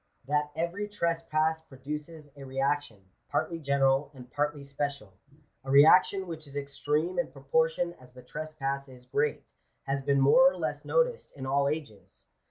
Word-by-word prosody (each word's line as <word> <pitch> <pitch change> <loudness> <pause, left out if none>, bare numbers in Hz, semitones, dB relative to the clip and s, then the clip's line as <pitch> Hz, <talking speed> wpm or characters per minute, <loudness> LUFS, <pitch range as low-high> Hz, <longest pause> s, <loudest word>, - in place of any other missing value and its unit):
That 150 +1 0
every 170 +6 -2
trespass 165 -4 0
produces 150 +2 -8
a 140 - -10
reaction, 135 -6 -2 0.2
partly 165 -1 -1
general 140 -1 +2
and 125 -1 -12
partly 145 0 -1
special 140 -6 -4 0.3
— - - -38
a 135 - -8
reaction 160 +7 +6
which 160 -3 -7
is 140 - -13
extreme 150 +5 -1
in 175 - -1
proportion 160 +5 0
as 125 0 -16
the 125 0 -14
trespass 140 -1 -4
is 125 -1 -14
great, 455 +1 -1 0.3
has 135 0 -2
been 140 0 +2
more 255 - +6
or - - -8
less 150 -4 -3
noticed - - +1
in 130 - -6
all 140 +1 +2
ages. 140 -10 -7
145 Hz, 160 wpm, -29 LUFS, 135-160 Hz, 0.3 s, reaction